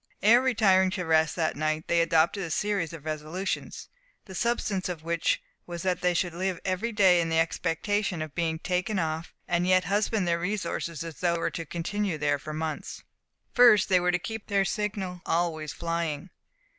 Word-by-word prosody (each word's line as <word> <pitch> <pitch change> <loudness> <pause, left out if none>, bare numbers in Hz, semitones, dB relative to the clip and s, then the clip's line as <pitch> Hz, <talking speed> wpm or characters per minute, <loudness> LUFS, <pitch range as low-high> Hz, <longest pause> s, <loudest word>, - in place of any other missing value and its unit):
Ere 230 +4 +7
retiring 200 -7 +4
to 185 -2 -3
rest 160 -1 +3
that 160 -2 0
night 155 +1 -1
they 170 0 +3
adopted 165 +4 +2
a 170 - -4
series 195 -1 -1
of 160 -3 -10
resolutions, 155 +5 -4 0.4
the 190 - -10
substance 200 -2 -1
of 165 -3 -5
which 170 0 0 0.3
was 170 -1 -6
that 185 -2 0
they 180 -1 +2
should 175 0 0
live 185 0 -2
every 190 +5 -1
day 190 -5 +5
in 165 - -2
the 165 - +1
expectation 170 +4 0
of 155 -2 -5
being 165 -2 -1
taken 185 +5 -1
off, 160 -1 -2 0.2
and 175 +1 +1
yet 185 0 +4
husband 205 +1 0
their 170 0 +1
resources, 170 -4 -3
as 165 -2 -8
though 175 -1 +2
they - - -2
were - - 0
to 165 - -5
continue 180 +2 -2
there 145 -1 +1
for 155 - -7
months. 155 0 -5 0.5
1st. 240 -5 +7
They 185 -1 +5
were 180 0 +2
to 180 - +2
keep 220 +4 -6
their 200 -2 +2
signal 195 -4 -3
always 165 -3 -1
flying. 165 0 -3
175 Hz, 190 wpm, -27 LUFS, 165-195 Hz, 0.5 s, Ere